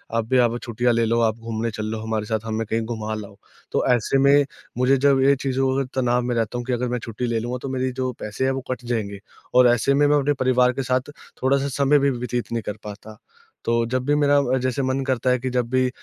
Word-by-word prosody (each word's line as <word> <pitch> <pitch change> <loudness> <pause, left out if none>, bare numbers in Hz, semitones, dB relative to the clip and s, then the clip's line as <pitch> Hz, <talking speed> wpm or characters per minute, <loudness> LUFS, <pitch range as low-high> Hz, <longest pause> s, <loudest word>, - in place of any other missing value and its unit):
आप 115 -1 +1
भी 130 - +3
अब 120 -1 +3
छुट्टियाँ 120 +1 0
ले 115 0 +2
लो। 115 +1 +1
आप 110 -1 +1
घूमने 115 0 -3
चल 110 -1 -5
लो 110 0 -3
हमारे 110 -1 -2
साथ, 110 0 -1
हमें 110 0 -2
कहीं 115 +2 0
घुमा 110 -1 -4
लाओ।" 100 -2 -8 0.4
तो - - 0
ऐसे 120 +3 0
में 140 +1 +5 0.3
मुझे 130 +2 +3
जब 135 0 +3
ये 140 +1 +5
चीज़ों 135 0 +1
को 135 - +1
अ, 135 - -2 0.2
तनाव 125 0 +2
में 120 0 -2
रहता 115 +1 -1
हूँ 120 - -4
कि 125 - -1
अगर 125 +1 -1
मैं 125 0 -1
छुट्टी 115 +2 -3
ले 115 -1 0
लूँगा, 120 +3 -3
तो 135 - -5
मेरे 130 0 -1
जो 130 -1 -1
पैसे 105 +5 -3
हैं 135 - +2
वो 135 0 -3
कट 125 -1 -4
जाएँगे, 105 -4 -3 0.3
और 125 0 +6
ऐसे 120 +3 +3
में 145 +1 +3
मैं 145 0 +4
अपने 145 +1 +1
परिवार 125 -2 +3
के 135 - -3
साथ 130 +3 -1 0.3
थोड़ा-सा 140 +1 +2
समय 140 +1 +4
भी 140 - +2
व्यतीत 125 -2 -3
नहीं 115 -1 -1
कर 105 - -4
पाता। 105 +1 -10 0.5
तो 115 0 +1
जब 130 +2 -1
भी 145 +1 +2
मेरा 145 -1 +3 0.2
अ, - - +3
जैसे 130 +1 -1
मन 130 +1 0
करता 130 -1 0
है 125 0 +2
कि 130 +1 -3
जब 125 -2 -1
भी 130 0 +2
125 Hz, 260 wpm, -23 LUFS, 115-130 Hz, 0.5 s, और